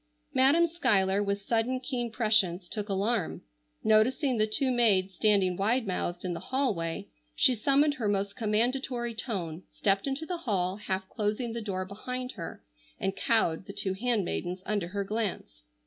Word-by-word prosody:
Madam 285 +6 +5
Schuyler, 205 - +2
with 200 0 -2
sudden 235 +4 0
keen 250 -2 -3
prescience, 215 -6 +2
took 210 +1 -4
alarm. 200 0 0 0.4
Noticing 240 +4 +3
the 215 - +3
two 260 +5 +1
maids 200 -6 +3
standing 195 -2 +3
wide 225 +6 +1
mouthed 180 -2 -3
in 180 - -1
the - - -5
hallway, 205 -12 -1 0.3
she 255 - +5
summoned 280 +6 +3
her 245 -7 -3
most 200 0 -1
commandatory 240 +2 0
tone, 185 -8 -3
stepped 195 +4 0
into 275 +4 -2
the 355 +1 -3
hall, 195 - -1
half 190 -2 -3
closing 215 +4 -2
the 235 - -4
door 190 -3 -3
behind 250 +6 -5
her, 170 - -8 0.4
and 195 0 -1
cowed 195 -5 +1
the 195 - -7
two 190 -1 -1
handmaidens 190 -4 -1
under 205 -5 -1
her 200 +2 -3
glance. 195 - -3
210 Hz, 160 wpm, -29 LUFS, 190-245 Hz, 0.4 s, Madam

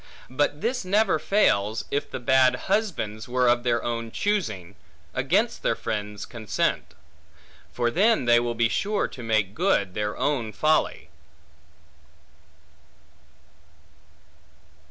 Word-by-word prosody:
But 145 +3 0
this 250 0 -1
never 195 -2 +2
fails, 110 - +1
if 145 +1 -1
the - - -5
bad 130 0 +4
husbands 160 - -2
were 125 0 +2
of 120 0 +3
their 120 -1 0
own 115 -1 -3
choosing, 110 - -2 0.4
against - - 0
their - - +1
friends' 105 -1 -4
consent; 110 -4 -2 0.8
for 120 -1 0
then 205 - +3
they 120 0 +5
will 120 0 -2
be 115 0 +2
sure 205 - -1
to 125 - -10
make 110 -4 0
good 130 - +1
their 105 0 -3
own 120 -7 -1
folly. 155 - 0
120 Hz, 115 wpm, -25 LUFS, 110-160 Hz, 0.8 s, they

